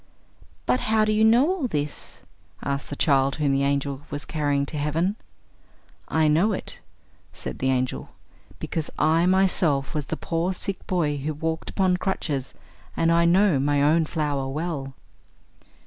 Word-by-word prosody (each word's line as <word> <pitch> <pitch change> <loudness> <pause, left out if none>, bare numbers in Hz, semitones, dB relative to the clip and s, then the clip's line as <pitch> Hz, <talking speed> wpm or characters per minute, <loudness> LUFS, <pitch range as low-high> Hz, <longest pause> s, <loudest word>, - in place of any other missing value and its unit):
"But 255 - +2
how 215 0 +2
do 215 - +1
you 215 +1 +3
know 235 +6 +5
all 360 -7 0
this?" 145 -7 -4 0.4
asked 140 0 -3
the 145 - -4
child 135 -2 +2
whom 145 -2 +1
the 135 0 +2
angel 140 0 -1
was 145 0 -5
carrying 145 -3 0
to 150 - -6
heaven. 165 +7 0 0.9
"I 160 -1 +2
know 170 +8 +3
it," - - -6 0.5
said - - -6
the 130 - +1
angel, 130 -1 -1 0.5
"because 160 -2 -4
I 165 +3 +3
myself 180 -7 +2
was 150 -3 -3
the 160 - -3
poor 170 +3 -1
sick 195 +1 -5
boy 155 -6 0
who 150 +2 -3
walked 160 +1 -3
upon 185 -2 +1
crutches, 150 -8 -3 0.4
and 165 0 +3
I 170 0 +4
know 180 -3 +4
my 145 +1 +2
own 160 +2 +4
flower 145 -4 -2
well." 140 -2 -4
155 Hz, 160 wpm, -24 LUFS, 140-180 Hz, 0.9 s, know